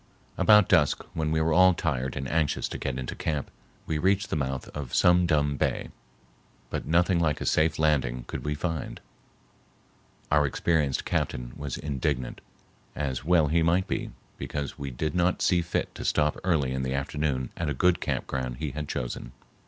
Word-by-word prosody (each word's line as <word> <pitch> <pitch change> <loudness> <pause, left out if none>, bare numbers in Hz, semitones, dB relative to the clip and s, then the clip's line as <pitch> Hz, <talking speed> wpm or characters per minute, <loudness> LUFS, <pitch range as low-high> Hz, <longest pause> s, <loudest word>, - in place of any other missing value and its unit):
About 105 -3 +6
dusk, 75 -6 +3
when 80 -1 -1
we 80 0 +2
were 80 0 +2
all 95 +1 +6
tired 65 -6 -2
and 65 0 -3
anxious 80 0 0
to - - -5
get 65 -2 -3
into 65 -1 -4
camp, 75 -3 -3 0.3
we 80 - -1
reached 95 +3 +1
the - - +1
mouth 65 -3 -2
of 70 -5 -5
Sum 90 0 +5
Dum 75 -3 +1
Bay, - - -1 0.8
but - - -3
nothing 85 +2 +3
like 75 -3 +1
a - - -4
safe 80 0 +2
landing 65 -6 +1
could - - -6
we 75 0 -1
find. 80 0 -3 1.3
Our 75 -1 +4
experienced 75 -1 0
captain - - -2
was 70 -3 -5
indignant, 70 -3 -2 0.5
as 70 -3 -2
well 85 0 +4
he 85 +2 +3
might 85 +3 +2
be, - - -2 0.3
because 70 -1 -4
we 70 -1 -4
did 75 +4 -3
not 90 0 +2
see 90 -2 +3
fit 85 - -2
to - - -7
stop 75 0 +2
early 80 -8 +1
in 65 0 -2
the 65 0 -2
afternoon 70 -2 -2
at 80 -3 -2
a 70 - -2
good 90 +6 +2
camp - - -1
ground 65 -2 -3
he 75 0 -3
had 75 +2 -5
chosen. - - -4
75 Hz, 185 wpm, -27 LUFS, 65-85 Hz, 1.3 s, About